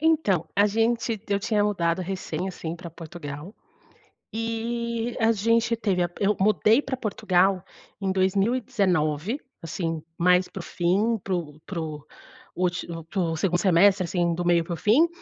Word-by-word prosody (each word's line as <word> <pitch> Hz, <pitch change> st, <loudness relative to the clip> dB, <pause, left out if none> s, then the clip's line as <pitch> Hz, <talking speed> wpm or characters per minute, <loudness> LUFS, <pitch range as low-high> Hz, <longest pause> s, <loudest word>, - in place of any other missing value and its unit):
Então, 300 Hz, -, +2 dB
a 205 Hz, +1 st, +5 dB
gente 225 Hz, +1 st, +1 dB
t 205 Hz, 0 st, -5 dB
eu 200 Hz, -, 0 dB
tinha 210 Hz, -1 st, +1 dB
mudado 170 Hz, -4 st, 0 dB
recém, 180 Hz, -1 st, -4 dB
assim, 170 Hz, -2 st, -5 dB
para 170 Hz, 0 st, -9 dB
Portugal, 160 Hz, +1 st, -8 dB, 0.8 s
e 230 Hz, +1 st, -2 dB
a 225 Hz, 0 st, +4 dB
gente 230 Hz, +2 st, +2 dB
teve 195 Hz, -6 st, 0 dB
a 175 Hz, -, +1 dB
p 175 Hz, +3 st, -2 dB
eu 210 Hz, 0 st, +2 dB
mudei 215 Hz, +5 st, +4 dB
para 265 Hz, -2 st, -3 dB
Portugal 195 Hz, -4 st, +1 dB, 0.4 s
em 195 Hz, -1 st, 0 dB
2019, 195 Hz, -, +1 dB, 0.2 s
assim, 165 Hz, -1 st, -3 dB, 0.2 s
mais 180 Hz, +1 st, +4 dB
para 190 Hz, -, -8 dB
o -, -, -7 dB
fim, 200 Hz, +7 st, +1 dB
para 190 Hz, -, -1 dB
o 155 Hz, -3 st, -5 dB
para 175 Hz, -4 st, -4 dB
o 150 Hz, -2 st, -6 dB, 0.5 s
últi 180 Hz, -1 st, -1 dB, 0.5 s
2º 175 Hz, -1 st, +1 dB
semestre, 190 Hz, +1 st, +4 dB
assim, 170 Hz, -1 st, 0 dB
do 175 Hz, -, -3 dB
meio 170 Hz, -1 st, +3 dB
para 170 Hz, +1 st, -4 dB
o -, -, -5 dB
fim, 225 Hz, -, +4 dB
190 Hz, 160 wpm, -25 LUFS, 175-225 Hz, 0.8 s, a